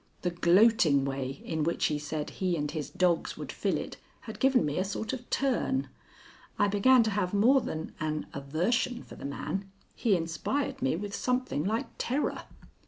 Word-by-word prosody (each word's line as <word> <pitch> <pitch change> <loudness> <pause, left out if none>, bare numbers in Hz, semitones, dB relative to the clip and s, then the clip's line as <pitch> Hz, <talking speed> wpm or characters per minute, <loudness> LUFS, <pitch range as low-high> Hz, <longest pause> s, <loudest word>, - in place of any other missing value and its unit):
The 180 - +1
gloating 175 -5 +4
way 135 0 -4
in 160 -1 -1
which 170 +2 0
he 150 -1 0
said 150 0 -4
he 180 -2 -1
and 150 -1 -2
his 155 -3 -4
dogs 175 -3 +1
would - - -6
fill - - 0
it - - -6 0.2
had - - -9
given 265 - +4
me 145 +2 -1
a - - +2
sort 205 +5 -3
of 250 -2 -7
turn. 270 0 0 0.7
I 205 - +3
began 230 +5 +5
to 220 - 0
have 200 -1 -1
more 255 +7 +5
than 160 -6 -5
an 155 0 -2
aversion 180 - -1
for - - -13
the - - -9
man. 195 +7 -4 0.3
He 220 -5 +2
inspired 170 - -2
me 135 - +1
with 200 +3 -5
something 250 - 0
like 220 +4 0
terror. 270 +5 -1
185 Hz, 180 wpm, -29 LUFS, 155-235 Hz, 0.7 s, began